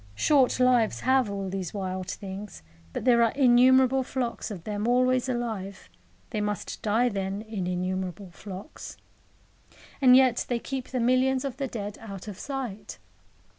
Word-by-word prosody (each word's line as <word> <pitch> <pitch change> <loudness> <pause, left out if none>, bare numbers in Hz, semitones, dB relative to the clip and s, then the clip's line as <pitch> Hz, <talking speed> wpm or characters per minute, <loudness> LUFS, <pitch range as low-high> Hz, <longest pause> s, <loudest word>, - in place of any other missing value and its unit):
Short 265 - +3
lives 250 -3 +3
have 260 -3 +2
all 200 -1 -4
these 185 -1 -4
wild 185 -2 -4
things, 195 - -7 0.3
but - - -5
there 240 -2 +5
are 230 -1 +3
innumerable 260 0 +5
flocks 250 -3 -3
of 190 -6 -7
them 210 +2 -3
always 255 +1 +2
alive; 220 -6 -4 0.4
they 215 -3 -2
must 210 -2 -4
die, 225 +4 +2
then, 195 -1 -3
in 210 -5 -4
innumerable 185 +1 -3
flocks. 195 - -9 1.0
And 255 -2 +7
yet 255 -2 +4
they 245 - +1
keep 260 +2 -5
the 255 - -3
millions 255 +2 +2
of 265 -2 -4
the 275 -1 -2
dead 205 -4 -6
out 200 -2 -8
of 205 -3 -7
sight. 245 -8 -5
225 Hz, 155 wpm, -27 LUFS, 195-255 Hz, 1.0 s, And